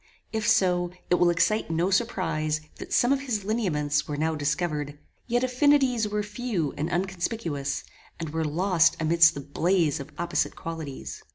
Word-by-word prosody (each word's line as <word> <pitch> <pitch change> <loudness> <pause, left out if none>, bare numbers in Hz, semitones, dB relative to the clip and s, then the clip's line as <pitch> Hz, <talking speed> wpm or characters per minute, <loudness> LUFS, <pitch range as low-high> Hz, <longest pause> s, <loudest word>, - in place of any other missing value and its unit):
If 220 0 -1
so, 180 -5 +3 0.2
it - - +6
will 175 - +5
excite 175 +5 +1
no 170 +4 0
surprize 155 -7 0 0.2
that - - -9
some 245 +3 +4
of 280 - 0
his 220 -7 -2
lineaments 150 -10 0
were 145 - -3
now 160 +2 0
discovered. 150 -1 -2 0.3
Yet 245 +1 +1
affinities 255 -3 +3
were 210 0 -1
few 205 - -2
and 155 +3 -2
unconspicuous, 175 -5 -2 0.4
and 160 -2 -4
were 160 +1 -1
lost 170 +2 +2
amidst 160 0 +5
the 140 - -5
blaze 160 +2 +1
of 140 +2 -8
opposite 170 0 -1
qualities. 160 -5 -6
175 Hz, 160 wpm, -26 LUFS, 155-210 Hz, 0.4 s, it